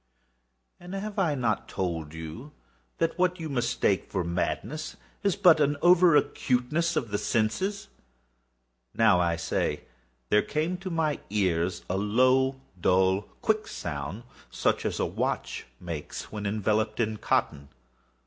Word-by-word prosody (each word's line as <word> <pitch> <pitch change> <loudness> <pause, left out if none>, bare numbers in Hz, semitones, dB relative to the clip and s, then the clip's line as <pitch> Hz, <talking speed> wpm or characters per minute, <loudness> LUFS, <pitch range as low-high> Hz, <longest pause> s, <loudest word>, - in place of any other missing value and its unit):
And 180 +2 -8
have 205 +1 -4
I 165 -6 +2
not 115 -6 -1
told 80 -4 -3
you 80 - -8 0.4
that 165 +2 -1
what 180 0 +2
you 160 -1 -4
mistake 120 -6 0
for 95 -3 -1
madness 105 - -3 0.2
is 200 -3 +1
but 180 -6 +6
over 165 +4 +5
acuteness 150 +6 +1
of 115 - -1
the 105 - 0
sense?—now, 120 - 0 1.3
I 85 -1 +2
say, 80 - -1 0.5
there 105 - +5
came 160 +5 -1
to 185 +1 -6
my 160 -4 0
ears 90 -4 0
a 95 - -1
low, 130 +6 +3 0.2
dull, 95 +2 +3 0.2
quick 215 -1 +1
sound, 75 - -5 0.3
such - - 0
as - - -3
a - - +2
watch - - -3
makes 85 -4 -6
when 105 -1 -4
enveloped 110 +1 0
in 110 -2 0
cotton. 70 -7 0
120 Hz, 130 wpm, -27 LUFS, -, 1.3 s, but